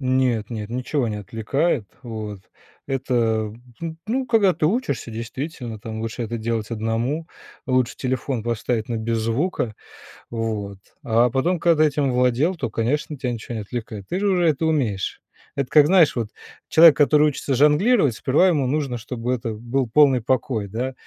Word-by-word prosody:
Нет 130 Hz, -4 st, +1 dB
нет, 110 Hz, -3 st, -5 dB
ничего 125 Hz, +1 st, -1 dB
не 105 Hz, -, -3 dB
отвлекает. 115 Hz, -, -1 dB, 0.2 s
Вот, 110 Hz, -4 st, -6 dB, 0.5 s
это, 135 Hz, -1 st, -2 dB
м, 110 Hz, -1 st, 0 dB, 0.2 s
ну 165 Hz, -1 st, -5 dB
ну 255 Hz, +3 st, -1 dB
когда 215 Hz, -5 st, +4 dB
ты 155 Hz, -1 st, 0 dB
учишься, 155 Hz, -, -1 dB
действительно, 115 Hz, 0 st, -6 dB
там, 110 Hz, +1 st, -6 dB
лучше 115 Hz, +2 st, -4 dB
это 115 Hz, +1 st, -3 dB
делать 115 Hz, -1 st, -3 dB
1 115 Hz, +8 st, -2 dB, 0.4 s
лучше 130 Hz, -1 st, +1 dB
телефон 130 Hz, -2 st, -2 dB
поставить 115 Hz, 0 st, -2 dB
на 115 Hz, -, -1 dB
без 115 Hz, +1 st, -1 dB
звука. 115 Hz, +1 st, -1 dB, 0.6 s
Вот, 105 Hz, -4 st, -3 dB, 0.2 s
а 120 Hz, +2 st, +3 dB
потом, 165 Hz, +9 st, 0 dB
когда 155 Hz, -1 st, +4 dB
этим 140 Hz, -2 st, +1 dB
владел, 125 Hz, +8 st, +2 dB
то, 130 Hz, -9 st, -4 dB
конечно, 145 Hz, +7 st, -1 dB
тя 125 Hz, -1 st, -2 dB
ничего 120 Hz, +1 st, -6 dB
не 110 Hz, -, -3 dB
отвлекает, 105 Hz, -2 st, -6 dB
ты 180 Hz, -, -1 dB
же 205 Hz, -, +1 dB
уже 175 Hz, -3 st, +2 dB
это 155 Hz, +1 st, 0 dB
умеешь. 125 Hz, -12 st, -1 dB, 0.3 s
Это 140 Hz, -2 st, -1 dB
как, 150 Hz, -1 st, +6 dB
знаешь, 175 Hz, -4 st, +5 dB
вот 115 Hz, -4 st, -2 dB, 0.4 s
человек, 160 Hz, -2 st, +8 dB
который 150 Hz, 0 st, +4 dB
учится 140 Hz, -1 st, -2 dB
жонглировать, 150 Hz, -, +4 dB
сперва 145 Hz, +12 st, +3 dB
ему 150 Hz, -6 st, +1 dB
нужно, 135 Hz, -3 st, -1 dB
чтобы 120 Hz, +2 st, -3 dB
это 115 Hz, -2 st, -3 dB
был 120 Hz, +4 st, -2 dB
полный 135 Hz, 0 st, +5 dB
покой, 115 Hz, -3 st, -1 dB
да, 120 Hz, +6 st, -3 dB
125 Hz, 170 wpm, -22 LUFS, 115-150 Hz, 0.6 s, человек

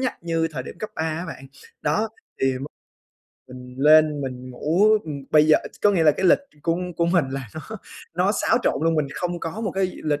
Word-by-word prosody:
nhắc 260 Hz, -, -1 dB
như 165 Hz, -1 st, 0 dB
thời 130 Hz, -4 st, -4 dB
điểm 170 Hz, -, -10 dB
cấp 215 Hz, -, -5 dB
3 160 Hz, -, -2 dB
á 160 Hz, +2 st, -2 dB
bạn. 135 Hz, -4 st, -9 dB, 0.4 s
Đó, 210 Hz, +10 st, +1 dB, 0.3 s
thì 130 Hz, -1 st, +2 dB
m 135 Hz, -, -6 dB, 0.8 s
mình 125 Hz, 0 st, -11 dB
lên 150 Hz, 0 st, +5 dB
mình 130 Hz, -1 st, -6 dB
ngủ, 165 Hz, +11 st, +2 dB, 0.2 s
ừm, 140 Hz, -3 st, -6 dB
bây 155 Hz, 0 st, +5 dB
giờ 155 Hz, -, +6 dB, 0.2 s
có 205 Hz, -, +6 dB
nghĩa 180 Hz, -5 st, +2 dB
là 150 Hz, -, +7 dB
cái 185 Hz, +5 st, 0 dB
lịch -, -, +6 dB, 0.2 s
của 165 Hz, +1 st, +1 dB, 0.2 s
của 170 Hz, -, +2 dB
mình 170 Hz, -3 st, +3 dB
là 135 Hz, -3 st, -5 dB
nó 155 Hz, -, -5 dB, 0.5 s
nó 185 Hz, +4 st, +2 dB
xáo 235 Hz, -, +2 dB
trộn -, -, +2 dB
luôn, 165 Hz, 0 st, +3 dB
mình 150 Hz, -2 st, +1 dB
không 175 Hz, 0 st, -3 dB
có 165 Hz, +7 st, -5 dB
một 215 Hz, -4 st, -2 dB
cái 190 Hz, -1 st, 0 dB
lịch 150 Hz, -1 st, 0 dB
155 Hz, 225 wpm, -23 LUFS, 140-175 Hz, 0.8 s, là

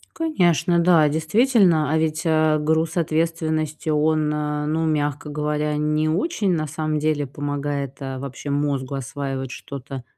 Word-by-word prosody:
Конечно, 175 Hz, -, +2 dB
да, 170 Hz, -3 st, +5 dB
действительно. 160 Hz, -, +3 dB
А 160 Hz, -, +2 dB
ведь, 160 Hz, 0 st, 0 dB
э, 155 Hz, -1 st, +3 dB
груз 160 Hz, +2 st, 0 dB
ответственности 160 Hz, -1 st, -1 dB
он, 155 Hz, 0 st, +2 dB
э, 150 Hz, 0 st, -2 dB
ну, 160 Hz, +2 st, 0 dB
мягко 150 Hz, -2 st, -1 dB
говоря, 150 Hz, 0 st, -1 dB
не 150 Hz, +1 st, +1 dB
очень 200 Hz, -, 0 dB
на 155 Hz, -2 st, -1 dB
самом 155 Hz, 0 st, -2 dB
деле 150 Hz, -1 st, 0 dB
помогает, 145 Hz, 0 st, -3 dB
э, 135 Hz, -1 st, -4 dB
вообще 135 Hz, +2 st, -7 dB
мозгу 140 Hz, -2 st, -1 dB
осваивать 135 Hz, -1 st, -4 dB
что-то 135 Hz, 0 st, -7 dB
155 Hz, 140 wpm, -22 LUFS, 145-160 Hz, -, да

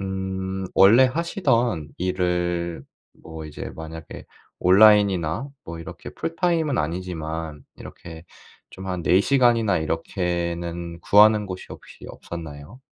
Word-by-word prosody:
음 95 Hz, 0 st, -4 dB
원래 110 Hz, +7 st, +7 dB
하시던 125 Hz, -, 0 dB
일을 90 Hz, -3 st, -1 dB, 0.4 s
뭐 80 Hz, -1 st, -8 dB
이제 75 Hz, -, -7 dB
만약에 80 Hz, 0 st, -9 dB, 0.3 s
온라인이나 100 Hz, -, +4 dB, 0.2 s
뭐 85 Hz, 0 st, -7 dB
이렇게 -, -, -9 dB
풀타임은 165 Hz, -4 st, -1 dB
아니지만 80 Hz, -2 st, -4 dB
이렇게 80 Hz, 0 st, -11 dB, 0.5 s
좀 95 Hz, 0 st, -10 dB
한 90 Hz, -2 st, -3 dB
4 90 Hz, +3 st, +4 dB
시간이나 115 Hz, -6 st, +3 dB
이렇게는 85 Hz, +1 st, -3 dB
구하는 105 Hz, +2 st, +5 dB
곳이 95 Hz, -1 st, -7 dB
혹시 -, -, -12 dB
없었나요? 80 Hz, -, -9 dB
90 Hz, 255 characters per minute, -23 LUFS, 80-105 Hz, 0.5 s, 원래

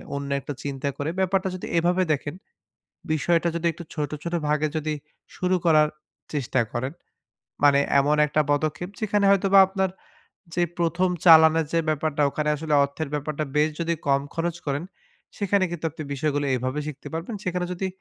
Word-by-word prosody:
অন্য 140 Hz, 0 st, -4 dB
একটা 145 Hz, -, -5 dB
চিন্তা 140 Hz, 0 st, -3 dB
করে 145 Hz, +2 st, -2 dB
ব্যাপারটা 190 Hz, 0 st, +1 dB
যদি 185 Hz, -, -6 dB
এভাবে 180 Hz, +2 st, +2 dB
দেখেন, 145 Hz, +2 st, -4 dB, 0.8 s
বিষয়টা 170 Hz, +2 st, +1 dB
যদি 170 Hz, 0 st, -3 dB
একটু 170 Hz, -, -9 dB
ছোট, 150 Hz, -3 st, -2 dB
ছোট 170 Hz, -, -4 dB
ভাগে 150 Hz, +1 st, +1 dB
যদি 155 Hz, 0 st, -2 dB, 0.4 s
শুরু 185 Hz, 0 st, +1 dB
করার 155 Hz, -2 st, +5 dB, 0.5 s
চেষ্টা 130 Hz, -3 st, 0 dB
করেন। 130 Hz, +3 st, -2 dB, 0.7 s
মানে 140 Hz, -1 st, +6 dB, 0.2 s
এমন 145 Hz, +2 st, +2 dB
একটা 150 Hz, +1 st, +1 dB
পদক্ষেপ 155 Hz, +4 st, 0 dB
যেখানে 205 Hz, -2 st, +1 dB
হয়তোবা 195 Hz, 0 st, +5 dB
আপনার 190 Hz, -1 st, 0 dB, 0.6 s
যে 175 Hz, -, +1 dB, 0.2 s
প্রথম 170 Hz, +2 st, +1 dB, 0.2 s
চালানের 160 Hz, -1 st, +7 dB
যে 165 Hz, -, +3 dB
ব্যাপারটা, 155 Hz, -1 st, 0 dB
ওখানে 150 Hz, +1 st, -2 dB
আসলে 155 Hz, 0 st, -1 dB
অর্থের 140 Hz, +2 st, -4 dB
ব্যাপারটা 150 Hz, +1 st, -2 dB
বেশ 150 Hz, +1 st, +4 dB
যদি 170 Hz, 0 st, 0 dB
কম 140 Hz, 0 st, +3 dB
খরচ 170 Hz, 0 st, -2 dB
করেন, 140 Hz, +3 st, -1 dB, 0.5 s
সেখানে 200 Hz, -1 st, +1 dB
কিন্তু 170 Hz, -2 st, -6 dB
আপনি 155 Hz, +1 st, -8 dB
বিষয়গুলো 145 Hz, 0 st, -1 dB
এভাবে 130 Hz, +4 st, -2 dB
শিখতে 150 Hz, -2 st, -7 dB
পারবেন। 165 Hz, +8 st, -4 dB
সেখানে 180 Hz, 0 st, -1 dB
যদি, 190 Hz, +2 st, -3 dB
155 Hz, 165 wpm, -25 LUFS, 145-175 Hz, 0.8 s, চালানের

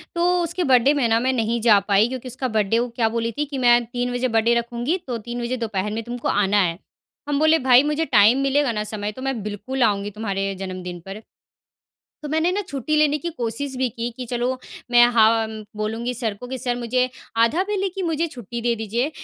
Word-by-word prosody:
तो 340 Hz, -, +1 dB, 0.2 s
उसके 340 Hz, +2 st, -2 dB
बर्थडे 265 Hz, -1 st, +4 dB
में 280 Hz, -5 st, +1 dB
ना, 225 Hz, 0 st, +3 dB
मैं 255 Hz, +2 st, +1 dB
नहीं 230 Hz, -1 st, 0 dB
जा 215 Hz, -3 st, +6 dB
पाई, 205 Hz, +2 st, +4 dB
क्योंकि 255 Hz, 0 st, -6 dB
उसका 255 Hz, +1 st, -2 dB
बर्थडे 215 Hz, +1 st, +1 dB
वो 240 Hz, -, 0 dB
क्या 230 Hz, -2 st, +2 dB
बोली 230 Hz, 0 st, -2 dB
थी 295 Hz, -, 0 dB
कि, 280 Hz, -1 st, -6 dB
"मैं 240 Hz, -1 st, +4 dB
3 245 Hz, +1 st, -3 dB
बजे 245 Hz, +1 st, 0 dB
बर्थडे 225 Hz, 0 st, +2 dB
रखूँगी, 235 Hz, +7 st, -1 dB
तो 245 Hz, -2 st, -2 dB
3 240 Hz, +2 st, -6 dB
बजे 240 Hz, +2 st, -2 dB
दोपहर 210 Hz, -3 st, -2 dB
में 225 Hz, -, -2 dB
तुमको 240 Hz, +1 st, -5 dB
आना 205 Hz, 0 st, +2 dB
है।" 170 Hz, -2 st, 0 dB, 0.5 s
हम 285 Hz, -1 st, +1 dB
बोले, 315 Hz, +1 st, +4 dB
"भाई, 250 Hz, +1 st, +7 dB
मुझे 300 Hz, +2 st, 0 dB
टाइम 225 Hz, -2 st, +5 dB
मिलेगा 275 Hz, -1 st, +2 dB
ना, 210 Hz, -2 st, -2 dB
समय, 210 Hz, -1 st, -4 dB
तो 260 Hz, -, -11 dB
मैं 265 Hz, -4 st, -2 dB
बिल्कुल 210 Hz, +6 st, -2 dB
आऊँगी 205 Hz, -2 st, +1 dB
तुम्हारे 195 Hz, -2 st, -2 dB
जन्मदिन 180 Hz, -2 st, -6 dB
पर।" 195 Hz, +2 st, -7 dB, 1.0 s
तो 295 Hz, -, -5 dB
मैंने 320 Hz, +3 st, +1 dB
ना 400 Hz, +3 st, -1 dB
छुट्टी 280 Hz, 0 st, -2 dB
लेने 300 Hz, -1 st, +3 dB
की 340 Hz, +4 st, -4 dB
कोशिश 265 Hz, -1 st, -4 dB
भी 255 Hz, -1 st, 0 dB
की, 235 Hz, +1 st, -4 dB
कि, 255 Hz, -, -5 dB
"चलो, 245 Hz, +2 st, -2 dB, 0.3 s
मैं 240 Hz, 0 st, +7 dB
हा 220 Hz, -1 st, +7 dB, 0.2 s
म 220 Hz, -1 st, -8 dB
बोलूँगी 225 Hz, +3 st, -2 dB
सर 230 Hz, -3 st, -2 dB
को 245 Hz, -, -9 dB
कि 260 Hz, +1 st, -4 dB
सर, 245 Hz, -1 st, -1 dB
मुझे 250 Hz, +1 st, 0 dB, 0.4 s
आधा 325 Hz, +11 st, 0 dB
बेले 395 Hz, -1 st, -1 dB
की 380 Hz, +1 st, -5 dB
मुझे 330 Hz, -1 st, 0 dB
छुट्टी 240 Hz, -, -7 dB
दे 235 Hz, 0 st, +1 dB
दीजिए, 230 Hz, +5 st, -2 dB
240 Hz, 225 wpm, -22 LUFS, 220-270 Hz, 1.0 s, भाई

